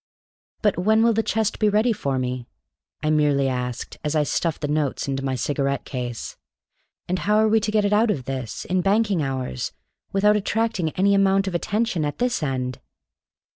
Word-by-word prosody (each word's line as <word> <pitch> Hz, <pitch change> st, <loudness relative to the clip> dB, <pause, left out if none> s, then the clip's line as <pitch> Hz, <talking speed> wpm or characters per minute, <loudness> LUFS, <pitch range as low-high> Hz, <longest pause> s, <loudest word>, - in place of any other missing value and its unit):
"But 205 Hz, -4 st, +2 dB
when 220 Hz, +4 st, +3 dB
will 230 Hz, 0 st, +4 dB
the 225 Hz, -, +2 dB
chest 220 Hz, -1 st, -1 dB
be 215 Hz, -, +4 dB
ready 215 Hz, +3 st, +3 dB
for 140 Hz, -9 st, -2 dB
me," 125 Hz, -1 st, -3 dB, 0.6 s
I 155 Hz, -, +2 dB
merely 145 Hz, -3 st, +3 dB
asked, 125 Hz, -1 st, -4 dB
as 150 Hz, +1 st, -1 dB
I 150 Hz, -, +3 dB
stuffed 160 Hz, +2 st, -1 dB
the 145 Hz, -, -1 dB
notes 150 Hz, -2 st, -1 dB
into 135 Hz, -1 st, -2 dB
my 135 Hz, -1 st, -1 dB
cigarette 140 Hz, +1 st, -1 dB
case. 120 Hz, -3 st, -5 dB, 0.7 s
"And 185 Hz, +1 st, -1 dB
how 210 Hz, +1 st, +2 dB
are 220 Hz, 0 st, +4 dB
we 220 Hz, +1 st, +4 dB
to 215 Hz, 0 st, -2 dB
get 210 Hz, -1 st, +2 dB
it 205 Hz, -, +1 dB
out 220 Hz, +2 st, +4 dB
of 140 Hz, -11 st, -1 dB
this, 130 Hz, -4 st, -5 dB
in 185 Hz, 0 st, +1 dB
banking 200 Hz, -2 st, +2 dB
hours, 130 Hz, -, -3 dB, 0.4 s
without 210 Hz, +2 st, +4 dB
attracting 210 Hz, -4 st, 0 dB
any 200 Hz, +2 st, +3 dB
amount 195 Hz, 0 st, +3 dB
of 190 Hz, -, -2 dB
attention 205 Hz, 0 st, 0 dB
at 145 Hz, 0 st, -2 dB
this 245 Hz, -3 st, 0 dB
end?" 130 Hz, -3 st, -2 dB
175 Hz, 190 wpm, -23 LUFS, 135-210 Hz, 0.7 s, will